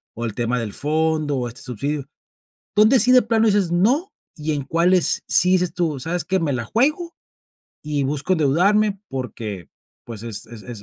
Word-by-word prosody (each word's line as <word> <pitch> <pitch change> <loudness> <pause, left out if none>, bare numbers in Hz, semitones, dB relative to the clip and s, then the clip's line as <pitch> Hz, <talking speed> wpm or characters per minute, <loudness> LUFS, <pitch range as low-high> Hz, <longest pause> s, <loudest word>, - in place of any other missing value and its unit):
o 115 - -4
el 110 - -4
tema 120 +1 -1
del 110 -3 -4
fondo, 155 -1 0
o 125 - -2
este 120 +1 -10
subsidio? 140 +4 -4 0.7
¿Dónde 215 +5 +5
sí 250 +4 +4
de 255 - +7
plano 225 0 +2
dices: 200 -5 +2
"No" 245 - +2 0.2
y 155 0 -3
en 145 -2 -3
cuáles, 170 +5 +2
sí 180 - +4
dices 180 -2 +1
tú: 160 -6 -1
"Sabes 165 +3 -3
qué, 190 +1 0
me 155 -5 -1
la 120 -2 -2
juego 305 - 0 0.7
y 150 -2 -1
busco 145 +5 -1
endeudarme"?, 195 +7 +2
porque, 115 - -6 0.4
pues, 115 -3 -8
es 110 -3 -5
es 115 -2 -11
es 115 -4 -9
155 Hz, 185 wpm, -21 LUFS, 125-195 Hz, 0.7 s, de